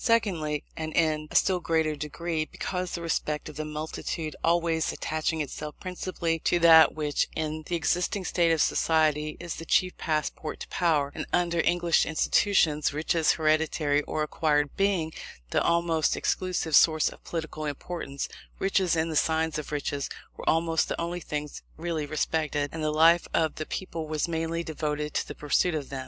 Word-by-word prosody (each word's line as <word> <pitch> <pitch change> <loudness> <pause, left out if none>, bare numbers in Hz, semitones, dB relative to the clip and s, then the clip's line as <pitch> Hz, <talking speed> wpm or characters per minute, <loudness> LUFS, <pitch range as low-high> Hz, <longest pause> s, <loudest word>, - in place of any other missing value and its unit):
Secondly, 170 -11 +1
and 155 0 -4
in 155 -2 +1
a - - -11
still 185 -1 +4
greater 160 -2 0
degree, 155 +2 -3
because 180 +2 -4
the 170 - -5
respect 155 -2 -2
of 155 - -11
the 155 - -3
multitude 155 +1 -4
always 165 -1 +2
attaching 155 0 -2
itself 150 +1 -6
principally 180 -3 -3
to 175 - +2
that 165 -1 +7
which, 150 -2 0
in 155 0 -2
the 175 - -1
existing 180 +3 0
state 170 -2 +2
of 160 -2 +3
society, 155 -2 +1
is 170 -1 -5
the - - -6
chief 185 +2 +2
passport 155 0 -2
to - - -6
power; 150 -5 +1
and - - -5
under 170 -1 +1
English 175 -1 +2
institutions, 160 -2 +2
riches, 155 +2 +2
hereditary 155 -2 +1
or 155 - -1
acquired, 150 -1 0
being 190 -5 +1 0.4
the - - +2
almost 170 -2 +2
exclusive 180 -4 0
source 155 0 +5
of - - -15
political 160 -2 -5
importance; 145 -1 -4 0.3
riches, 190 -2 +1
and 160 0 0
the - - -3
signs 160 0 +1
of 150 - -7
riches, 145 -1 -2 0.3
were - - -2
almost 165 0 +2
the - - -3
only 170 +1 -2
things 150 -3 -5 0.2
really 160 -2 -3
respected, 150 -1 -1
and 160 -1 -4
the 155 - +1
life 165 +3 +5
of 160 -2 +2
the 155 - -4
people 165 -4 -5
was 155 +1 -1
mainly 165 0 -2
devoted 150 -2 -3
to - - -1
the - - -7
pursuit 155 +4 +1
of 145 -3 -4
them. 135 - -5
160 Hz, 175 wpm, -27 LUFS, 150-170 Hz, 0.4 s, that